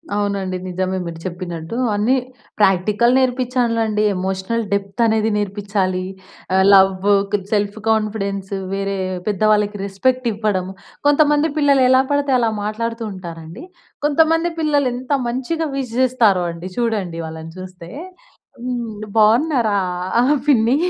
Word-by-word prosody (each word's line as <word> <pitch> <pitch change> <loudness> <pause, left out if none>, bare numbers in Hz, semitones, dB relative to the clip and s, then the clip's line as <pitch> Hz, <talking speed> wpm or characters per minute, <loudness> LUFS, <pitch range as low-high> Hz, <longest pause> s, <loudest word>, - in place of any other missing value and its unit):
అవునండి. 200 -2 -1
నిజమే. 185 +1 -2
మీరు 165 -1 -6
చెప్పినట్టు 175 0 -5 0.2
అన్నీ 220 +6 +2 0.4
ప్రాక్టికల్ 205 +5 +3
నేర్పిచ్చాలండి. 245 -4 +1
ఎమోషనల్ 190 +5 -2
డెప్తనేది 220 +2 +1
నేర్పిచ్చాలి. 200 -2 -1 0.5
ఆహ్, 190 0 +4
లవ్వు, 195 +1 +5 0.2
కొద్ 200 -2 -1
సెల్ఫ్ 205 0 0
కాన్ఫిడెన్సు, 200 -3 -1 0.2
వేరే 195 0 -2 0.3
పెద్దవాళ్ళకి 210 0 +2
రెస్పెక్టివ్వడం. 215 -3 0 0.4
కొంతమంది 295 +1 +4
పిల్లలు 280 -3 +4
ఎలా 260 0 +6
పడితే 285 -2 +1
అలా 230 -2 +2
మాట్లాడుతూ 230 +2 -3
ఉంటారండి. 170 - -9 0.4
కొంతమంది 325 +3 +3
పిల్లలు 290 -4 +2
ఎంత 255 +3 -7 0.2
మంచిగా 310 +6 -2
విష్ 250 -4 -4
చేస్తారో 230 -8 +3
అండి. 170 +2 -8
చూడండి, 210 -8 -1
వాళ్ళని 160 0 -8
చూస్తే 185 -2 -10 0.7
హ్మ్. 235 -4 -4
బాగున్నారా 230 0 +3 0.7
పిన్ని? 240 -2 +4
210 Hz, 110 wpm, -19 LUFS, 190-250 Hz, 0.7 s, ఎలా